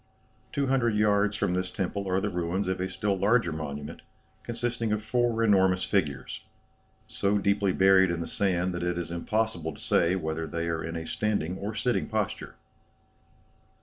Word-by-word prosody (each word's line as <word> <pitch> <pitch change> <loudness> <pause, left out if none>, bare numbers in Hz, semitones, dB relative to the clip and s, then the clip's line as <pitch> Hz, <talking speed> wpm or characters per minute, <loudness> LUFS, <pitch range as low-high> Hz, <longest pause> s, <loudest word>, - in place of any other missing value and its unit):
Two 140 - 0
hundred 125 -4 +2
yards 105 -1 +2
from 90 - 0
this 90 0 -1
temple 100 +1 -3
are 95 +1 +2
the 105 +1 -2
ruins 90 +3 -1
of 95 -1 -1
a 95 - -1
still 105 0 -1
larger 100 -1 +2
monument, 75 0 -6 0.4
consisting 115 -1 -2
of 105 0 -1
four 120 0 +1
enormous 95 -4 +4
figures, 75 -9 -1 0.6
so 100 +1 0
deeply 100 0 +2
buried 95 0 +5
in 85 -1 -1
the 85 - -4
sand 90 -2 0
that 85 - -4
it 90 0 -1
is 85 -1 -4
impossible 85 -2 -1
to - - -14
say 85 +2 +2
whether 80 -2 -3
they 85 0 -3
are 80 -1 -2
in 85 0 -5
a 80 -1 -4
standing 95 -4 -1
or 105 +2 -4
sitting 120 +3 0
posture." 110 -3 -3
95 Hz, 175 wpm, -28 LUFS, 85-105 Hz, 0.6 s, buried